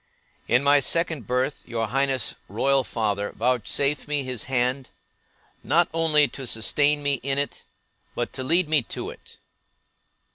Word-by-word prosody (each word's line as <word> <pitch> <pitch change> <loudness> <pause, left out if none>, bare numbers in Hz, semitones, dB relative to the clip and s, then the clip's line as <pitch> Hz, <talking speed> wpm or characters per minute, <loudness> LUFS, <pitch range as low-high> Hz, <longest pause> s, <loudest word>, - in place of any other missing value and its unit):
In 125 +3 +3
my 145 +1 +5
second 160 - 0
birth, 130 +3 -1
your 115 -2 -2
Highness' 135 -3 0 0.2
royal 135 +6 +2
father 105 -4 -2
vouchsafed 130 +5 0
me 145 -1 -1
his 130 -4 -3
hand, 130 +1 -1 0.7
not 170 +3 +2
only 155 -3 +3
to 130 +1 -6
sustain 145 +6 +2
me 140 -2 +1
in 135 +1 -1
it, 140 0 -3 0.5
but - - -3
to 130 - -5
lead 170 +5 +2
me 155 -2 +3
to - - -6
it. - - -15
135 Hz, 145 wpm, -24 LUFS, 125-145 Hz, 0.7 s, my